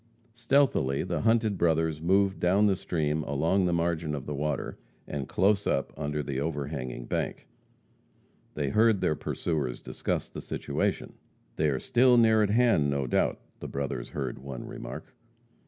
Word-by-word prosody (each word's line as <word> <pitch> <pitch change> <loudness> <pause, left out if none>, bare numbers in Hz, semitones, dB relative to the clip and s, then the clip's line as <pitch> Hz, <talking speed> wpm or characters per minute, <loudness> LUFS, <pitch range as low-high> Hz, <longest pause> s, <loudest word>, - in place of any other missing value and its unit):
Stealthily 115 - +2
the - - -2
hunted 110 -3 +2
brothers 80 -2 +1
moved 95 +3 +2
down 95 +4 +3
the 100 -2 +3
stream 80 -4 -1
along 80 +7 +1
the 90 - +1
margin 85 -2 0
of 70 -2 -6
the 75 - -4
water, 75 +2 -3 0.3
and 70 -3 -4
close 100 +1 +2
up 70 - 0
under 75 0 -2
the 70 -2 -3
overhanging 70 -5 -4
bank. - - -3 1.1
They 70 -2 -1
heard 110 +5 +4
their - - +2
pursuers 75 -4 -2
discuss - - -3
the - - -8
situation. - - -2 0.4
"They 75 -1 +2
are 65 -2 -1
still 125 - +4
near 110 -2 +5
at 105 - +2
hand, 110 -10 +3
no 70 -1 0
doubt," 60 - 0 0.2
the - - -6
brothers 70 -3 -4
heard 65 -4 -4
one 65 -1 -7
remark. - - -8
80 Hz, 155 wpm, -28 LUFS, 70-100 Hz, 1.1 s, near